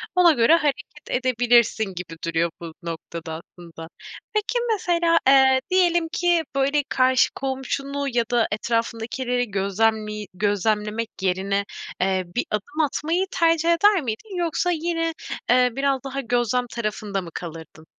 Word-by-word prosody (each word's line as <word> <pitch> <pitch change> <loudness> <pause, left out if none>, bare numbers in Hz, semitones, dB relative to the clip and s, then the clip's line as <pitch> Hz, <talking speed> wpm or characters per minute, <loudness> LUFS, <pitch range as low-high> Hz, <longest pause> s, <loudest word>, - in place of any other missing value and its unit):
ona 360 -2 +6
göre 245 +3 +5
hareket 290 -2 -1 0.2
edebilirsin 240 -3 +2
gibi 170 -2 -7
duruyor 165 0 0
bu 165 -1 -7
noktada 165 -1 -6 0.2
aslında. 165 -2 -10 0.5
Peki 430 +3 0
mesela, 340 -4 +2
eee, 265 -1 +6
diyelim 345 -2 +3
ki, 345 -2 +2
böyle, 280 +2 +2
karşı 255 -1 +3
komşunu 275 +1 -3
ya 235 -1 +2
da 240 -2 +3
etrafındakileri 235 +2 -2
gözlemli 210 +1 0
gözlemlemek 210 +3 0
yerine, 195 +2 0 0.4
eee, 190 0 +1
bir 245 - 0
adım 215 +9 -4
atmayı 320 +5 0
tercih 330 -1 +2
eder 400 +2 +4
miydin? 265 - -5
Yoksa 345 +1 0
yine, 330 0 -1 0.4
eee, 250 0 +5
biraz 275 -1 0
daha 275 0 -4
gözlem 245 0 0
tarafında 210 -3 -3
mı 175 - -9
kalırdın? 160 -2 -9
245 Hz, 130 wpm, -23 LUFS, 210-300 Hz, 0.5 s, ona